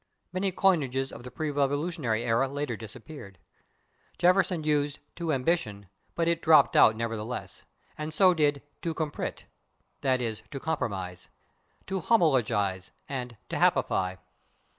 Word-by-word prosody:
Many 190 +1 0
coinages 140 -9 +1
of 115 - -10
the 125 - -7
pre 150 +4 -3
Revolutionary 145 -4 0
era 120 +3 +2
later 140 -2 -3
disappeared. 110 - -10 0.8
Jefferson 180 -2 +3
used 150 -1 +1 0.2
/to 170 -2 -1
ambition/ 125 - -1 0.3
but 165 -1 +1
it 170 0 +1
dropped 160 -1 +6
out 110 - +7
nevertheless, 115 -3 -5 0.3
and 155 +1 -3
so 185 +4 +5
did 145 -4 +1 0.2
/to 165 -2 -2
compromit/, 155 -2 -3 0.6
(/i. 130 -2 +2
e./, 115 -4 -3
to 140 - -6
compromise), 95 - -3 0.6
/to 190 -1 -2
homologize/, 110 - +2 0.2
and 125 -4 -5
/to - - -3
happify 95 0 +2
140 Hz, 130 wpm, -28 LUFS, 115-160 Hz, 0.8 s, out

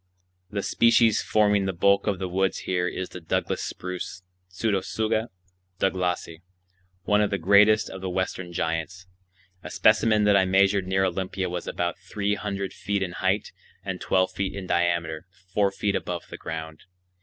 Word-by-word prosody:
The 100 -1 -3
species 115 -1 +4
forming 105 -2 +2
the 95 - -1
bulk 100 +4 +3
of 100 -2 +1
the 95 0 -3
woods 95 +1 0
here 90 -1 0
is 95 +1 -4
the 90 - -9
Douglas 80 - -1
spruce 90 0 -6 0.3
(Pseudotsuga 110 +3 -1 0.5
douglasii), 90 -3 -1 0.6
one 105 +2 +3
of 105 - +2
the 100 - -1
greatest 100 +4 +5
of 95 - -8
the 95 - -3
western 95 -1 -3
giants. 85 +2 -3 0.6
A - - -8
specimen 110 0 +3
that 105 -1 +4
I 95 -1 +5
measured 95 0 +3
near 95 0 +2
Olympia 95 0 -2
was 90 -1 -4
about 85 +2 -2
three 100 +2 -2
hundred 100 -2 -3
feet 100 -1 -2
in 90 - -3
height 95 +3 -1 0.3
and - - -4
twelve 95 0 +2
feet 95 -1 -3
in 100 -2 -5
diameter 85 -2 0 0.3
four 100 -1 +3
feet 100 +1 -1
above 85 -1 -3
the - - -6
ground. 80 -1 -7
95 Hz, 165 wpm, -25 LUFS, 90-100 Hz, 0.6 s, greatest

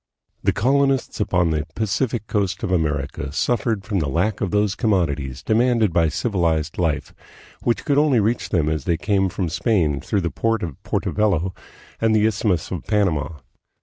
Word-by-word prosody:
The - - +2
colonists 135 +2 +1
upon 90 -5 +1
the 75 0 -1
Pacific 110 +1 -1
coast 100 -3 -1
of 105 - -1
America 75 -5 -1
suffered 115 - 0
from 100 -3 -1
the 75 -4 -1
lack 90 +8 0
of 100 - 0
those 105 0 +1
commodities 75 - -1
demanded 115 -3 +2
by 85 -2 +3
civilized 85 -6 -1
life, 80 -4 -1 0.5
which 120 - 0
could 145 0 +3
only 145 -5 +4
reach 110 +3 0
them 80 -5 +1
as 80 0 -1
they 85 -2 +1
came 95 +1 +1
from 90 0 -2
Spain 80 -4 +1
through 100 - -1
the 85 - -2
port 115 -2 0
of 80 -6 -6
Porto - - -2
Bello 95 -4 +1 0.5
and 110 -1 +3
the 105 0 +4
Isthmus 105 -6 0
of 90 -4 -4
Panama. 85 - 0
95 Hz, 175 wpm, -22 LUFS, 80-110 Hz, 0.5 s, only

